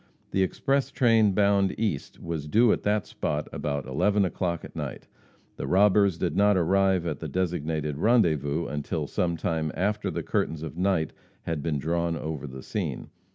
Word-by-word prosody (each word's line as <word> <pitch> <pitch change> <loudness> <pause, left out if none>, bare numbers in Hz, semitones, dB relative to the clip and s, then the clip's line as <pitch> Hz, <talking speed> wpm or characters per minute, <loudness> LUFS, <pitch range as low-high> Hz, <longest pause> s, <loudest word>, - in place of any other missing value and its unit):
The 95 - +1
express 135 +8 +1
train 115 -7 +4
bound 100 -1 +2
east 105 -11 -2
was 80 -3 -4
due 115 +8 +4
at - - -2
that 105 0 +1
spot 75 +1 -3
about 70 -1 -2
11 100 +10 +2
o'clock 85 -1 -2
at - - -12
night. - - -5 0.5
The 65 - -4
robbers 100 +1 +4
did 90 0 -1
not 100 0 +4
arrive 95 0 +2
at 75 -4 -3
the - - -5
designated 80 -5 -2
rendezvous 85 - +2
until 75 +2 -3
some 85 +3 -1
time 80 -1 -1
after 105 +3 0
the - - -3
curtains 80 -1 -1
of 80 -1 -6
night 90 -3 0 0.3
had 80 -3 -2
been 75 -1 -1
drawn 85 +3 -1
over 75 -2 -5
the 65 0 -9
scene. - - -4
85 Hz, 170 wpm, -27 LUFS, 75-100 Hz, 0.5 s, train